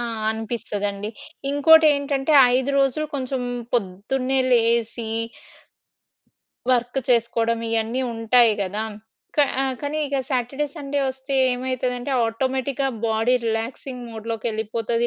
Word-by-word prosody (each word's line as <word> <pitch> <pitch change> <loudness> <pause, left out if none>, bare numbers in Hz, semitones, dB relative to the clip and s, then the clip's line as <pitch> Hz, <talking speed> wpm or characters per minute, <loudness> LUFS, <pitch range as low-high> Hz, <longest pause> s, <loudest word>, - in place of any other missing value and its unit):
ఆ! - - -1 0.3
అనిపిస్తది 220 -2 -3
అండి. 200 +2 -6 0.4
ఇంకోటేంటంటే 290 -1 +4 0.2
5 265 +2 0
రోజులు 275 +3 +1
కొంచెం 260 -1 -2 0.3
పొద్దున్నే 245 +6 0
లేసి... 230 -1 +2 1.6
వర్క్ 245 +1 +1
చేసుకోవడం 230 -1 +2
ఇయన్నీ 225 +3 0
ఉంటాయి 225 0 +4
కదా! 205 +3 -3 0.5
క - - -8 0.4
కానీ 295 +1 -3
ఇగ 280 0 -2
సాటర్‌డే, 270 +3 -1
సండే 285 -2 -2
వస్తే 265 +1 -4 0.2
ఏమైతదంటే 250 0 -2 0.2
ఆటోమేటిక్‌గా 265 +3 -1 0.2
బాడీ 225 +3 +2
రిలాక్సింగ్ 240 +3 -3
మోడ్‌లోకెళ్ళిపోతది. 225 +1 -2
245 Hz, 100 wpm, -23 LUFS, 225-270 Hz, 1.6 s, ఇంకోటేంటంటే